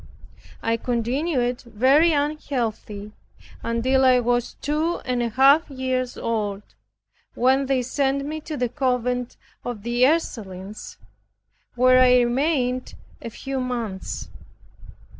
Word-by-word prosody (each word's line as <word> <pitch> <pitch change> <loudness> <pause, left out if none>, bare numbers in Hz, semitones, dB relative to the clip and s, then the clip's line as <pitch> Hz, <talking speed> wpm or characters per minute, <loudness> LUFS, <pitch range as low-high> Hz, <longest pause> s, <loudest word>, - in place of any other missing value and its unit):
I 230 0 +1
continued 245 +2 -1
very 265 +8 +3
unhealthy 250 -8 -2 0.5
until 255 +3 +1
I 255 -1 +5
was 245 0 0
two 310 +4 -1
and 250 -1 0
a 235 - 0
half 275 +7 +5
years 260 -2 -2
old, 210 -3 -2 0.7
when 265 +2 +2
they 260 -2 +1
sent 275 +2 0
me 310 +2 -4
to 305 -1 -6
the 245 - 0
convent 250 -1 -1 0.3
of 240 -5 -5
the 240 +1 +1
Ursulines, 210 - -3 0.8
where 255 +1 +5
I 250 -1 +6
remained 255 0 0 0.3
a 230 - -6
few 270 +4 -5
months. 235 -6 -4
250 Hz, 115 wpm, -23 LUFS, 235-275 Hz, 0.8 s, I